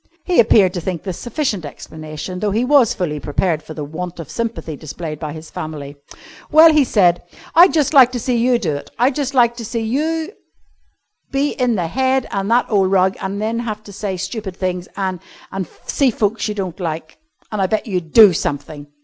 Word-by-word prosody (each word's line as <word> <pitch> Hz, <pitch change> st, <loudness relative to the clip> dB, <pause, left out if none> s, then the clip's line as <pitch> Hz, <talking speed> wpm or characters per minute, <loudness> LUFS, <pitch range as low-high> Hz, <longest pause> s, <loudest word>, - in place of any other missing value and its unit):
He 360 Hz, -, +1 dB
appeared 210 Hz, -5 st, +5 dB
to 175 Hz, -, -3 dB
think 175 Hz, -2 st, -4 dB
this 185 Hz, -4 st, -5 dB
sufficient 240 Hz, -, -2 dB
explanation, 155 Hz, +4 st, -7 dB
though 210 Hz, -, 0 dB
he 220 Hz, +5 st, 0 dB
was 270 Hz, -4 st, +5 dB
fully 150 Hz, -5 st, -2 dB
prepared 155 Hz, +2 st, -1 dB
for 155 Hz, -, -10 dB
the 150 Hz, -, -4 dB
want 170 Hz, +4 st, -6 dB
of 165 Hz, -, -8 dB
sympathy 230 Hz, -9 st, -4 dB
displayed 155 Hz, +1 st, -7 dB
by 155 Hz, -2 st, -5 dB
his 155 Hz, +1 st, -10 dB
family. 145 Hz, -2 st, -6 dB, 0.6 s
"Well," 315 Hz, +1 st, +8 dB
he 300 Hz, -2 st, +5 dB
said 180 Hz, -8 st, +3 dB
firmly, -, -, -22 dB
"I'd 350 Hz, +3 st, +7 dB
just 305 Hz, -2 st, +1 dB
like 260 Hz, -3 st, +7 dB
to 245 Hz, -, -2 dB
see 250 Hz, +1 st, -1 dB
you 240 Hz, +1 st, +3 dB
do 155 Hz, -11 st, -2 dB
it, 145 Hz, -, -8 dB
I'd 255 Hz, +4 st, +3 dB
just 275 Hz, -1 st, -3 dB
like 235 Hz, -2 st, +4 dB
to 235 Hz, -, -6 dB
see 230 Hz, +1 st, -3 dB
you 315 Hz, -, -1 dB, 1.0 s
be 280 Hz, +1 st, 0 dB
in 250 Hz, -3 st, 0 dB
the 180 Hz, -4 st, -1 dB
head 260 Hz, +7 st, +1 dB
and 195 Hz, +1 st, -2 dB
that 240 Hz, +2 st, +3 dB
ole 195 Hz, -3 st, +3 dB
rug 190 Hz, 0 st, +2 dB
an' 210 Hz, +4 st, -2 dB
have 215 Hz, -3 st, -4 dB
to 200 Hz, -, -12 dB
say 195 Hz, -1 st, -4 dB
stupid 190 Hz, 0 st, -5 dB
things 180 Hz, -1 st, -2 dB
an' 190 Hz, -2 st, -2 dB, 0.3 s
an' 190 Hz, -3 st, -4 dB, 0.2 s
see 275 Hz, -2 st, +2 dB
folks 220 Hz, -1 st, -1 dB
you 210 Hz, -, -3 dB
don't 190 Hz, -2 st, -4 dB
like, 160 Hz, -2 st, -5 dB, 0.3 s
an' 215 Hz, -, -3 dB
I 190 Hz, -, +2 dB
bet 215 Hz, +2 st, -1 dB
you'd 180 Hz, -7 st, -3 dB
do 215 Hz, -5 st, +8 dB
something." 145 Hz, -1 st, -4 dB
200 Hz, 210 wpm, -19 LUFS, 175-240 Hz, 1.0 s, Well